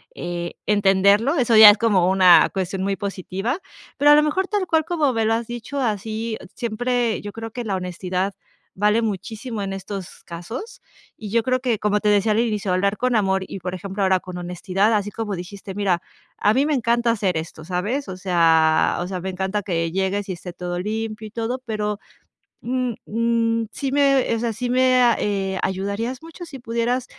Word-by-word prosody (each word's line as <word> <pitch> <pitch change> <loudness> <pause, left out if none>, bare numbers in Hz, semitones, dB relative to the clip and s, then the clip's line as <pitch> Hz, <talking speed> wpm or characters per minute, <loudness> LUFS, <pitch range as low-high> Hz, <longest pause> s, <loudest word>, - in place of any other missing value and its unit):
eh, 175 0 -4
entenderlo. 205 - +3
Eso 240 -5 +2
ya 215 -1 +12
es 205 - +5
como 200 -5 +3
una 185 -2 +6
cuestión 190 0 -3
muy 195 0 0
positiva, 200 - -3 0.4
pero 290 +1 +6
a - - +9
lo 300 - +5
mejor 375 +6 0
tal 410 -2 -1
cual 320 -2 +2
como 310 -6 +1
me 225 -1 0
lo 225 - +2
has 230 - -2
dicho 240 +4 -5
así 220 -1 -2 0.2
siempre, 240 0 -1
yo 205 - -7
creo 225 +1 -7
que 245 +2 -5
la 205 -4 -2
honestidad 185 +1 -3 0.4
vale 210 +3 +3
muchísimo 220 +2 -4
en 195 - -3
estos 195 -1 -7
casos 225 - -8 0.3
y 210 -2 -8
yo 230 +1 +1
creo 255 0 0
que 235 -5 0
como 210 0 +1
te 210 - +2
decía 210 +1 +3
al 215 - +1
inicio 210 -4 0
de - - +2
hablar 200 +2 +1
con 250 +1 +1
amor 190 -3 +1
y 195 - -7
por 180 +1 -5
ejemplo, 195 +2 -4
ahora 190 -1 +3
con 180 0 -8
honestidad, 185 +4 0
así 205 0 0
como 210 -3 -4
dijiste: 190 +2 -8
"Mira, 190 -4 0 0.4
a 210 - +3
mí 270 +4 +2
me 300 - +1
encanta 235 -2 +1
hacer 195 -6 0
esto, 160 0 -6
¿sabes? 190 - -2
O 185 - -6
sea 165 -4 +3
o 175 - -3
sea, 185 -1 -4
me 190 - -4
encanta 190 +2 -2
que 165 -3 -1
llegues 195 +1 -1
y 190 - -3
esté 175 +1 -8
todo 175 0 -5
limpio 215 +3 -4
y 210 - -13
todo, 235 +3 -3
pero, 210 -2 -2 0.6
mm 250 -1 -1
mm, 230 0 0
sí 275 -2 -3
me 275 -3 +3
o - - -2
sea, 235 0 -1
sí 245 +3 -4
me, 255 0 +4 0.2
eh, 195 -2 -1
ayudarías 200 +8 -3
mucho 330 +2 -10
si 290 -5 -9
pudieras 240 +1 -1
210 Hz, 200 wpm, -22 LUFS, 190-235 Hz, 0.6 s, ya